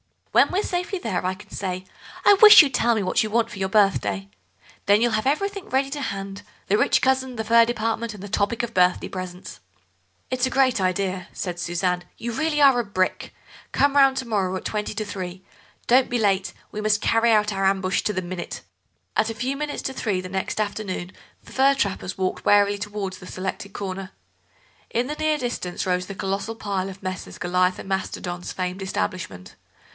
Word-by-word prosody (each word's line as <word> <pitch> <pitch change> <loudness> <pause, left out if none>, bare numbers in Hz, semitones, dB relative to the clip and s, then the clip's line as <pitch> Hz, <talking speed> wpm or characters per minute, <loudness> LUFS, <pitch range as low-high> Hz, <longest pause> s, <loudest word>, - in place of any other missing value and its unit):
When - - +5
we're 390 +3 0
safely 360 +2 -2
there 225 - -2
I 185 - +1
can 205 - -16
say: 185 -1 -4 0.4
'I 405 - +8
wish 420 0 +10
you'd 275 -3 -2
tell 235 0 +3
me 210 - 0
what 185 - +2
you 215 - -1
want 230 +1 +1
for 210 - -8
your 190 0 -1
birthday.' 105 - +2 0.6
Then 205 +1 +6
you'll 240 0 +3
have 215 +3 0
everything 395 +7 -1
ready 270 +1 +1
to 290 0 -4
hand—the 195 -1 -4
rich - - +3
cousin, 260 -1 +1
the 220 - -3
fur 230 +1 +5
department, 230 -1 -2
and 195 - -10
the 205 - -7
topic 210 +3 0
of 235 -1 -4
birthday 180 -1 +2
presents." 185 -1 -7 0.7
"It's 255 0 +1
a - - -2
great 260 -4 +3
idea," 185 0 -1
said 175 -2 -4
Suzanne; 175 +1 -1
"you 235 - -4
really 300 +4 0
are 270 -3 +6
a - - +1
brick. 185 -2 -1 0.4
Come 285 0 +3
round 270 -1 +5
to 260 -2 -3
morrow 195 -4 0
at 185 - -6
twenty 210 -1 -2
to 215 0 -2
three; 185 -2 -6 0.4
don't 255 +2 +4
be 245 - 0
late, 195 -4 +1 0.2
we 210 - -4
must 215 0 +2
carry 230 +1 +3
out 210 -1 +3
our 195 0 0
ambush 190 0 +1
to 210 - 0
the 185 - -1
minute." 175 0 -6 0.6
At 220 - +2
a 225 - -4
few 255 +5 -2
minutes 295 +1 -4
to 265 - -3
three 210 -7 -1
the 185 - -8
next 190 +2 -3
afternoon 205 -4 -3 0.3
the - - -15
fur 275 +1 +4
trappers 195 -6 -2
walked 185 -1 -2
warily 205 0 +4
towards 205 -2 -4
the 180 - -11
selected 190 +1 -5
corner. 195 0 -5 0.8
In 240 +2 0
the 300 - -3
near 310 0 +1
distance 240 -9 -3
rose 180 0 0
the 195 - -7
colossal 195 +4 -3
pile 195 -3 -3
of 195 0 -11
Messrs. 185 0 -5
Goliath 180 +1 +1
and - - -9
Mastodon's 180 -2 -3
famed 185 +1 -3
establishment. 185 - -4
205 Hz, 200 wpm, -24 LUFS, 185-240 Hz, 0.8 s, wish